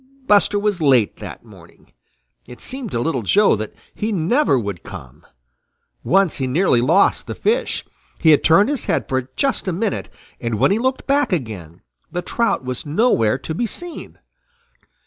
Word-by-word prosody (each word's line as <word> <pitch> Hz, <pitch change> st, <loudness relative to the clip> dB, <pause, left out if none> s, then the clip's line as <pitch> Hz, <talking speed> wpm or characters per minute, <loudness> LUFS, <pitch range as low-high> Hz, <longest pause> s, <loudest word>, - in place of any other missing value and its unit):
Buster 205 Hz, -2 st, +3 dB
was 205 Hz, -3 st, -1 dB
late 130 Hz, -8 st, +3 dB
that -, -, -9 dB
morning. -, -, -18 dB, 0.6 s
It 125 Hz, 0 st, -12 dB
seemed 260 Hz, -4 st, -5 dB
to 115 Hz, -, 0 dB
Little 130 Hz, -1 st, -1 dB
Joe 200 Hz, -, +4 dB
that 110 Hz, +1 st, -6 dB, 0.2 s
he 215 Hz, +2 st, -3 dB
never 200 Hz, -, +2 dB
would 100 Hz, -7 st, -4 dB
come. 65 Hz, -1 st, -11 dB, 0.8 s
Once 195 Hz, -2 st, +2 dB
he 130 Hz, -, -2 dB
nearly 130 Hz, -2 st, +2 dB
lost 165 Hz, +11 st, +3 dB
the -, -, -5 dB
fish. 480 Hz, +3 st, -1 dB, 0.3 s
He 160 Hz, -, +4 dB
had 150 Hz, -, +4 dB
turned 195 Hz, +9 st, +5 dB
his 290 Hz, -3 st, -3 dB
head -, -, -1 dB
for 130 Hz, -1 st, -2 dB
just 275 Hz, -7 st, 0 dB
a -, -, +1 dB
minute, 195 Hz, +4 st, -2 dB, 0.3 s
and 115 Hz, -2 st, -2 dB
when 105 Hz, -, +3 dB
he 205 Hz, -, +2 dB
looked 260 Hz, +2 st, -1 dB
back 280 Hz, -2 st, +1 dB
again, 105 Hz, -, -4 dB, 0.3 s
the 175 Hz, 0 st, -3 dB
trout 230 Hz, -, -1 dB
was 125 Hz, -1 st, -4 dB
nowhere 145 Hz, -, +2 dB
to 160 Hz, -, -6 dB
be 235 Hz, +8 st, -1 dB
seen. 350 Hz, -, -7 dB
170 Hz, 170 wpm, -20 LUFS, -, 0.8 s, turned